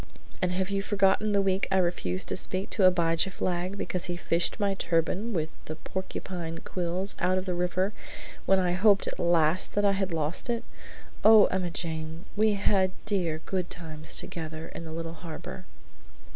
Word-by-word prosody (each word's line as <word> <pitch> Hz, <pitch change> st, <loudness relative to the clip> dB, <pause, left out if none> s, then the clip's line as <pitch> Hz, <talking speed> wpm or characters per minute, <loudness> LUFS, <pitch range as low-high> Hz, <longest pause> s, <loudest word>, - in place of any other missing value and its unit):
"And 180 Hz, -, +1 dB
have 190 Hz, +2 st, -1 dB
you 195 Hz, 0 st, 0 dB
forgotten 205 Hz, +1 st, +2 dB
the 200 Hz, -1 st, +3 dB
week 190 Hz, 0 st, +1 dB
I 190 Hz, -, +3 dB
refused 170 Hz, -, 0 dB
to -, -, -1 dB
speak 185 Hz, +1 st, -1 dB
to 195 Hz, -, +3 dB
Abijah 170 Hz, 0 st, +2 dB
Flagg 185 Hz, +1 st, -2 dB
because 180 Hz, -2 st, -2 dB
he 175 Hz, -1 st, -3 dB
fished 170 Hz, +3 st, 0 dB
my 200 Hz, -1 st, +1 dB
turban 185 Hz, +5 st, 0 dB
with 160 Hz, -5 st, -1 dB
the 155 Hz, -, -5 dB
porcupine 175 Hz, -1 st, -5 dB
quills 180 Hz, +2 st, -2 dB
out 185 Hz, +1 st, +2 dB
of 185 Hz, -, -2 dB
the 185 Hz, -, -1 dB
river 180 Hz, +3 st, 0 dB, 0.5 s
when 195 Hz, -, +5 dB
I 180 Hz, -2 st, +1 dB
hoped 200 Hz, +2 st, +4 dB
at -, -, -5 dB
last 170 Hz, 0 st, +2 dB
that 205 Hz, 0 st, +2 dB
I 200 Hz, -, +5 dB
had 195 Hz, -1 st, -1 dB
lost 160 Hz, -, -1 dB
it! 235 Hz, -1 st, -1 dB, 0.6 s
Oh, 215 Hz, -1 st, +8 dB
Emma 185 Hz, -1 st, -1 dB
Jane, 160 Hz, 0 st, -4 dB
we 215 Hz, 0 st, +3 dB
had 195 Hz, -2 st, +2 dB
dear 175 Hz, -7 st, 0 dB
good 185 Hz, -2 st, -2 dB
times 160 Hz, -2 st, -2 dB
together 160 Hz, -1 st, 0 dB
in 165 Hz, -, -8 dB
the 160 Hz, -, -7 dB
little 165 Hz, 0 st, -5 dB
harbor.'" 170 Hz, +2 st, -8 dB
180 Hz, 180 wpm, -28 LUFS, 165-195 Hz, 0.6 s, Oh